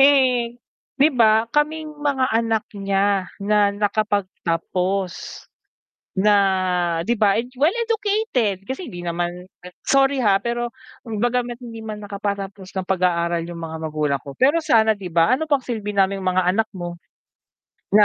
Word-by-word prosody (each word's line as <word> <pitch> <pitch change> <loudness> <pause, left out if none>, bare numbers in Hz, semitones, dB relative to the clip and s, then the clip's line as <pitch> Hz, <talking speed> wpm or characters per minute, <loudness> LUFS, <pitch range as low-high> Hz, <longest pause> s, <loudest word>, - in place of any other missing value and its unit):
Eh, 255 -4 +4 0.4
'di 280 +2 +5
ba 220 -3 +4
kaming 305 +1 0
mga 270 -4 +1
anak 225 0 +1 0.2
niya 195 -1 +1 0.2
na 210 0 +4
nakapagtapos 195 -3 -2 0.8
na 205 +1 +5 0.7
'di 240 - +2
ba, 210 -1 +3 0.2
well-educated 400 - 0
kasi 265 +7 -5
hindi 175 - -7
naman 175 +1 -3 0.4
sorry 275 0 +3
ha, 210 -6 +4
pero 240 0 -1 0.4
bagamat 240 +2 -1
hindi 230 -2 -8
man 215 -1 -7
nakapatapos 200 -1 -5
ng 190 - -1
pag-aaral 170 -2 0
yung 170 -1 -7
mga 160 0 -5
magulang 150 -3 -1
ko, 140 +1 -10
pero 285 +6 +4
sana 230 -9 +4
'di 200 -3 -4
ba 170 +5 +3
ano 315 - -2
pang 285 -4 +1
silbi 210 -4 -4
namin 195 0 +2
yung 190 - -4
mga 185 - +3
anak 220 +3 +1
mo? 175 -1 -6 1.0
Na 210 - +8
210 Hz, 140 wpm, -22 LUFS, 185-250 Hz, 1.0 s, Na